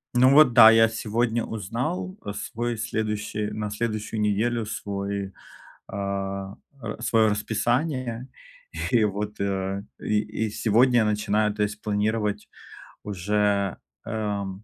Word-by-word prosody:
Ну 130 +1 +6
вот 155 -3 +7
да, 115 -2 +10
я 115 0 +5
сегодня 115 +1 -1
узнал, 95 -3 -3
а, 100 - -5
свой 120 +2 -3
следующий 105 -1 -2
на 105 0 -3
следующую 110 0 -3
неделю 110 +2 +1
свой, 100 -2 -4 0.5
а, 100 0 -4 0.3
а, 110 +1 -6
своё 110 -2 +3
расписание. 120 +4 -1 0.6
И 115 -3 +4
вот, 105 +1 -2
а, 95 0 -1 0.2
и 105 0 +1 0.3
и - - -2
сегодня 120 +4 +3
я 110 - +3
начинаю, 105 0 +1
то 105 - -4
есть 105 +1 -3
планировать 105 0 -1 0.6
уже, 100 0 0 0.3
эм, 100 -2 -3
105 Hz, 125 wpm, -25 LUFS, 100-115 Hz, 0.6 s, да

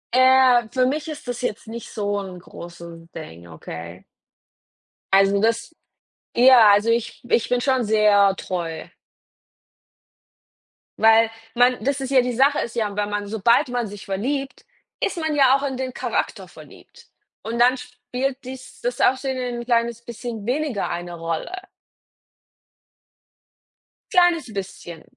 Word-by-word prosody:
Äh, 255 -2 +5
für 255 -1 +2
mich 295 +4 -2
ist 300 -4 -8
das 245 0 -4
jetzt 230 -2 -4
nicht 230 0 -8
so 205 -2 -2
'n 190 -2 -8
großen 170 -1 -12
Ding, 85 - -10
okay? 85 +2 -9 1.1
Also 195 +1 +4
das 230 +8 0 0.6
ja, 245 -3 +7
also 205 +3 +3
ich 230 0 -1
ich 235 - +2
bin 245 0 0
schon 260 -3 +1
sehr 205 -2 +4
treu. 170 -3 -5 2.1
Weil 225 0 +5 0.3
man 245 +1 +3
das 280 +1 -1
ist 265 0 -4
ja 260 - +5
die 245 0 -2
Sache 275 +4 +3
ist 235 - -4
ja, 210 -3 -2
wenn 205 0 -1
man 205 0 -3
sobald 220 +4 +2
man 245 -2 -2
sich 205 0 -10
verliebt, 270 +8 -3 0.3
ist 390 - -2
man 315 -2 -1
ja 270 -2 +5
auch 275 - -2
in 270 -2 -3
den 260 -1 -4
Charakter - - -3
verliebt. - - -16 0.3
Und 230 +1 -4
dann 250 +2 +5
spielt 250 +1 -5
dies 255 0 -10
das - - -2
Aussehen 265 0 +1 0.2
'n - - -9
kleines 235 -1 0
bisschen 235 -2 -7
weniger 260 -3 -1
eine 175 0 -5
Rolle. 165 - -4 2.6
Kleines 345 - +3
bisschen. 185 -4 -7
235 Hz, 140 wpm, -22 LUFS, 200-260 Hz, 2.6 s, ja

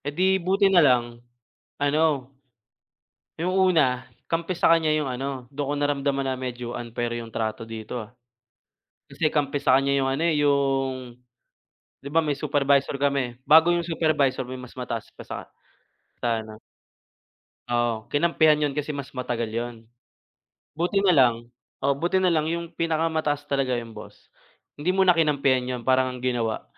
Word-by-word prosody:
Eh - - 0
di, 190 +1 +3
buti 195 +3 +2
na 175 - +7
lang 120 -4 +2 0.6
ano, 145 -2 +1 1.1
yung 180 +3 -1
una 160 -10 +3 0.3
kampi 170 +2 -1
sa - - +3
kaniya 155 -2 +2
yung - - -2
ano 130 0 -4
dun 140 0 -3
ko - - 0
naramdaman 140 -1 0
na 130 - 0
medyo 125 -2 -5
unfair 120 0 -4
yung 115 - -9
trato 110 0 -3
dito, 115 +2 -6
ah. - - -19 1.0
Kasi 155 -2 -1
kampi 145 -1 0
sa 130 -2 +4
kanya 140 0 0
'yong 135 -1 +1
ano, 135 +4 -1
eh, 165 - +2
yung 135 -3 0 0.8
'di 140 - -8
ba 165 - +4
may 145 -2 -1
supervisor 140 -2 +1
kami 140 -3 0
bago 160 +3 +6
yung 170 0 -1
supervisor 150 -6 +1
may 130 - -5
mas 125 0 -12
mataas 115 -3 -5
pa - - -10
sa - - -5 0.8
sa 115 -2 0
ano 110 0 -12 1.1
Oo, 120 -2 -1
kinampihan 155 0 +3
yun 150 -2 0
kasi 150 +1 -3
mas 140 -1 -7
matagal 120 -3 -3
yun. 120 +1 -3 1.0
Buti 175 +6 -1
na 185 - +5
lang 125 -6 +5 0.5
oh, 140 +1 +3
buti 175 +6 0
na 185 - +2
lang 155 -2 +2
yung 170 0 -4
pinakamataas 160 -3 -1
talaga 135 -3 0
yung 115 -1 -9
boss 105 - -12 0.5
hindi 155 +5 -1
muna 190 -1 +5
kinampihan 135 -6 +1
yun - - -9
parang 130 -1 +2
ang - - -11
ginawa, 120 -3 -1
140 Hz, 160 wpm, -25 LUFS, 125-155 Hz, 1.1 s, na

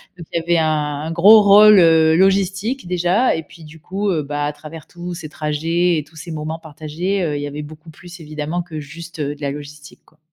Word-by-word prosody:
Donc 170 -3 -12
il - - -1
y - - -8
avait 170 0 +1
un 150 -2 -1
un - - -4
gros 205 +6 +7
rôle, 205 0 +7
heu, 160 -1 +5
logistique 195 +5 +1
déjà 180 +7 +1
et 160 - -3
puis 160 +1 -16
du 155 +1 -14
coup, 195 +5 -3
heu, 160 -3 0
bah, 145 0 -3
à 145 - -3
travers 155 +1 -11
tous 175 0 -8
ces 160 -3 -8
trajets 165 +3 -1
et 150 - -3
tous 160 +2 -24
ces 170 +2 -10
moments 155 +1 -5
partagés, 160 +5 -4
heu, 150 -3 -2
il 145 - -3
y 145 - -4
avait 150 +1 -6
beaucoup 155 +2 -13
plus 175 +2 -13
évidemment 155 +2 -4
que 165 -3 -8
juste, 165 +3 -10
heu, 145 0 -2
de 145 - -20
la 140 - -2
logistique 145 +1 -10
quoi. 155 - -29
160 Hz, 240 wpm, -19 LUFS, 150-175 Hz, -, gros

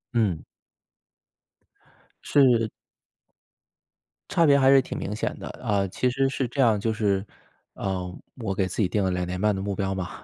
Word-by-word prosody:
嗯。 100 -9 +1 1.8
是。 120 -6 +4 1.6
差 170 -4 +3
别 140 -1 +6
还 135 -1 +5
是 135 -1 +7
挺 - - -6
明 105 - -4
显 - - -3
的。 - - -7
啊， 100 -2 0
其 125 +7 0
实 135 +2 +1
是 135 -1 -2
这 135 +4 -1
样 110 -5 +4
就 110 +2 -1
是， 100 -2 0 0.5
呃， 90 -2 -3 0.2
我 110 -6 -3
给 95 -1 +1
自 95 - -3
己 95 - +3
定 100 +2 0
了 95 - +1
2 90 0 -1
年 90 +1 -4
半 105 0 +2
的 95 - -3
目 100 0 -3
标 95 0 -1
嘛。 95 -2 -4
105 Hz, 180 characters per minute, -25 LUFS, 95-125 Hz, 1.8 s, 是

